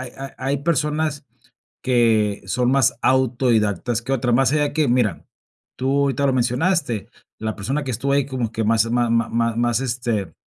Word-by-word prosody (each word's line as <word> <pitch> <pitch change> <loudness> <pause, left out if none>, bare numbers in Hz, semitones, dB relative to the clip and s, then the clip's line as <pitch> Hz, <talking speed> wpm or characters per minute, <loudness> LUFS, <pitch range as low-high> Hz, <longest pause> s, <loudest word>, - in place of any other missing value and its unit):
hay 130 - -7
ha 135 0 -8
hay 135 +2 -1
personas 150 -1 -1 0.6
que 115 -5 +2
son 125 +5 0
más 135 -2 +3
autodidactas 120 -4 +1
que 130 +4 -4
otras, 125 -2 0
más 135 +3 +3
allá 150 -1 +1
que 155 -1 +1
mira, 120 -8 0 0.5
tú 130 +1 -1
ahorita 140 0 0
lo 135 - +3
mencionaste, 130 - 0 0.3
la 110 -1 -3
persona 135 +9 -2
que 135 - -4
estuvo 130 +4 -1
ahí 140 -1 +2
como 125 -5 -3
que 115 - -2
más 115 +1 +2
ma 120 -1 +1
ma 115 0 +1
ma 115 0 0
más, 120 0 +1
este, 120 -8 -2
125 Hz, 180 wpm, -21 LUFS, 115-135 Hz, 0.6 s, más